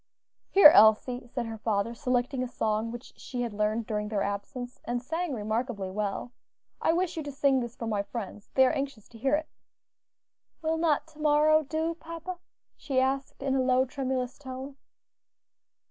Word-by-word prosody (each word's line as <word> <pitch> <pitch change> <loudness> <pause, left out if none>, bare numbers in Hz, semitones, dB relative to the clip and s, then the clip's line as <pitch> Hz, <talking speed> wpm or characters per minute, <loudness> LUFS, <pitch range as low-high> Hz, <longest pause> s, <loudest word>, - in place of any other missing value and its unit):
"Here, 385 -6 +10
Elsie," 240 +1 +5
said 240 0 -3
her 225 -1 -6
father, 215 +1 0
selecting 250 +1 -1
a 255 - -1
song 220 -2 -1
which 240 +1 -9
she 245 -2 -4
had 235 -3 -4
learned 215 +2 0
during 210 -1 -2
their 210 -2 0
absence, 205 +5 -5
and 240 +1 -2
sang 325 +6 -3
remarkably 215 -2 -2
well, 210 +4 -3 0.5
"I - - +3
wish 350 0 0
you - - -1
to 290 -1 -6
sing 275 -1 +2
this 240 -1 -5
for 230 - -6
my 210 -3 0
friends; 205 -1 -7
they 265 - +7
are - - +3
anxious 275 -6 -4
to 230 - -14
hear 270 +5 +2
it." 310 +1 -3 1.2
"Will 320 +1 +1
not 320 -3 +2
to 310 -1 -19
morrow 305 +1 +4
do, 315 +3 -2
papa?" 335 +2 -7 0.4
she 265 -3 -1
asked 270 +1 -1
in 270 -1 0
a 265 - +2
low, 255 0 +3
tremulous 260 -1 -3
tone. 265 0 -7
255 Hz, 175 wpm, -28 LUFS, 225-290 Hz, 1.2 s, Here